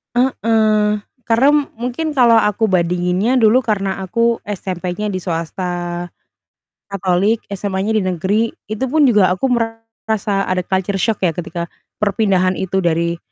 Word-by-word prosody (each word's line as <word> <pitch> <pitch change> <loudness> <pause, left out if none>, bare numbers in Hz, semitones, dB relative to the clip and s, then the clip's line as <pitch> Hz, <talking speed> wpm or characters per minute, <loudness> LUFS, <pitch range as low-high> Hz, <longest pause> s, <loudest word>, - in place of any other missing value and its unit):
Heeh. 220 -4 +2 0.2
Karena 230 +5 +3 0.3
mungkin 250 +7 -2
kalau 245 -5 +5
aku 220 0 +2
bandinginnya 180 +6 +1
dulu 235 +3 +4
karena 195 -3 -1
aku 230 +4 0
SMP-nya 185 0 -4
di 185 -3 -4
swasta 170 +1 -3 1.2
Katolik, 200 +3 0
SMA-nya 200 +1 -2
di - - +3
negeri, 185 +4 0 0.3
itu 220 +5 -1
pun 300 +4 +2
juga 210 -8 +5
aku 260 +7 -1
merasa 225 -3 -2
ada 185 0 0
culture 190 +2 -1
shock 215 +2 0
ya, 165 - -2
ketika 170 0 -4 0.3
perpindahan 195 -3 +1
itu 190 +1 -1
dari 170 -1 0
205 Hz, 130 wpm, -18 LUFS, 185-225 Hz, 1.2 s, kalau